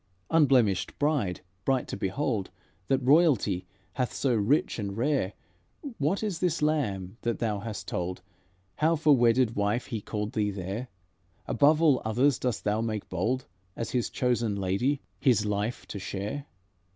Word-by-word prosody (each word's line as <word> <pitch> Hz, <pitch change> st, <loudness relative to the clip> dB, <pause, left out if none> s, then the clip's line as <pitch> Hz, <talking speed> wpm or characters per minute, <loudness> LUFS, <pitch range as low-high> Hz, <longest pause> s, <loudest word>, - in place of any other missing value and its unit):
"Unblemished 130 Hz, -, +3 dB
bride, 145 Hz, -12 st, 0 dB, 0.2 s
bright 130 Hz, 0 st, +1 dB
to -, -, -4 dB
behold, 100 Hz, +1 st, -1 dB, 0.4 s
That 135 Hz, -1 st, +1 dB
royalty 125 Hz, -, +3 dB, 0.3 s
hath 125 Hz, -2 st, -1 dB
so 135 Hz, -3 st, +1 dB
rich 115 Hz, +5 st, +1 dB
and 100 Hz, -1 st, -4 dB
rare, 125 Hz, -6 st, +1 dB, 0.7 s
What 160 Hz, +10 st, 0 dB
is 200 Hz, -7 st, -2 dB
this 170 Hz, -4 st, 0 dB
Lamb, 110 Hz, -11 st, -1 dB
that 115 Hz, 0 st, -1 dB
thou 110 Hz, -4 st, -1 dB
hast 105 Hz, 0 st, -6 dB
told 90 Hz, +1 st, -3 dB, 0.5 s
How 160 Hz, +2 st, +3 dB
for 150 Hz, -2 st, +5 dB
wedded 120 Hz, -1 st, +3 dB
wife 105 Hz, +4 st, 0 dB
He 115 Hz, -5 st, -4 dB
called 105 Hz, +2 st, -4 dB
thee 105 Hz, -3 st, +1 dB
there? 100 Hz, +5 st, -4 dB, 0.6 s
Above 155 Hz, +2 st, +4 dB
all 145 Hz, -5 st, +5 dB
others 125 Hz, +5 st, +2 dB
dost 125 Hz, -4 st, -2 dB
thou 105 Hz, +1 st, +1 dB
make 110 Hz, -2 st, -3 dB
bold, 110 Hz, +9 st, -1 dB, 0.3 s
As 115 Hz, -, -4 dB
His 125 Hz, -2 st, 0 dB
chosen 120 Hz, -4 st, 0 dB
lady 100 Hz, +9 st, 0 dB, 0.2 s
His 115 Hz, -5 st, +3 dB
life 105 Hz, +3 st, -2 dB
to 100 Hz, -, -5 dB
share? 100 Hz, +9 st, -4 dB
115 Hz, 150 wpm, -28 LUFS, 100-140 Hz, 0.7 s, for